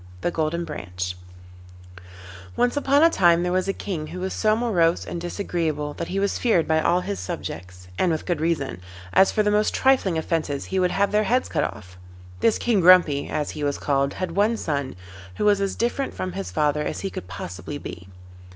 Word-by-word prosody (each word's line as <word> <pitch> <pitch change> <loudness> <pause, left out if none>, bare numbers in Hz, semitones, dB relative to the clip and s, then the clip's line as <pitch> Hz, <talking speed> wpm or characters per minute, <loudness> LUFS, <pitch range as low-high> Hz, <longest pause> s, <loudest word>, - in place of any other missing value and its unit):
THE - - 0
GOLDEN 165 +1 -1
BRANCH 90 - -5 1.4
Once 245 +2 +1
upon 285 +1 +3
a 330 - +7
time 175 - +4
there 180 - -1
was 185 +1 0
a - - +2
King 170 -6 -5
who 180 - -7
was 190 +1 -3
so 215 -1 +2
morose 180 -8 +1
and 170 - -5
disagreeable 165 -5 -2
that - - -5
he 195 - -2
was 200 0 0
feared 215 -9 +2
by 160 0 +2
all 175 +3 +2
his 100 - -4
subjects, 90 0 -7
and 180 - +3
with 160 - -2
good 175 -4 -1
reason, 155 - -1 0.3
as 190 - +5
for 215 - +1
the 210 - +2
most 210 +1 +2
trifling 260 -10 +3
offences 155 -3 -2
he 190 - -1
would 180 -1 +3
have 200 +2 +1
their 210 +1 +2
heads 250 +5 +1
cut - - 0
off. 90 -2 -9 0.4
This 225 - +3
King 235 -4 +1
Grumpy, 170 -5 +5
as 150 -1 -2
he 150 - -6
was 145 -1 0
called, 140 -1 0
had 185 -2 -3
one 215 +3 +2
son, 140 -7 -3 0.4
who - - -1
was 205 -1 +4
as 195 -1 -1
different 240 +4 -1
from 185 - -3
his 195 +2 -5
father 150 -1 +1
as 150 - -3
he 195 - -3
could - - -7
possibly 90 -1 -6
be. 90 +2 -9
175 Hz, 205 wpm, -24 LUFS, 150-200 Hz, 1.4 s, a